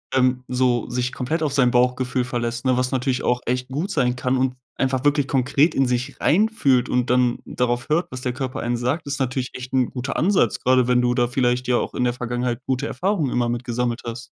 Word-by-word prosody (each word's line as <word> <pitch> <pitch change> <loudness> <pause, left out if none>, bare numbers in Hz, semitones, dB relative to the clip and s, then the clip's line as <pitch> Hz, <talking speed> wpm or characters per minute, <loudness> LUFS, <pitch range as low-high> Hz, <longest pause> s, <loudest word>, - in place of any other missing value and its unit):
ähm, 125 -1 +2
so 125 -2 +1
sich 125 +1 -1
komplett 155 +5 -2
auf 145 - -1
sein 135 -3 +4
Bauchgefühl 125 +1 +1
verlässt, 120 0 -3
ne, 130 -1 +3
was 125 0 0
natürlich 130 -1 -1
auch 125 0 +1
echt 125 +1 -1
gut 155 +10 -3
sein 125 -6 +1
kann 125 +1 0
und 130 0 0 0.2
einfach 130 +1 0
wirklich 145 -1 +2
konkret 135 +4 +2
in 135 - +3
sich 125 +3 -2
reinfühlt 160 - +2
und 125 0 +1
dann 125 -1 +2
darauf 120 0 -1
hört, 160 +4 0
was 130 - -6
der 125 -1 -2
Körper 130 -1 -4
einen 120 0 -1
sagt, 125 +8 -1
ist 140 0 -3
natürlich 130 -1 -2
echt 130 0 -8
'n 130 -2 +2
guter 130 +2 -4
Ansatz, 170 - +2
grade 130 -1 +3
wenn 125 0 +3
du 125 0 +2
da 120 0 +2
vielleicht 125 0 0
ja 125 -1 +3
auch - - -3
in - - -1
der 120 -1 +1
Vergangenheit 120 0 -3
gute 130 -1 -1
Erfahrungen 175 0 -1
immer 120 -1 +1
mit 120 +1 -2
gesammelt 120 0 -2
hast. 120 +1 -6
125 Hz, 225 wpm, -22 LUFS, 125-135 Hz, 0.2 s, sein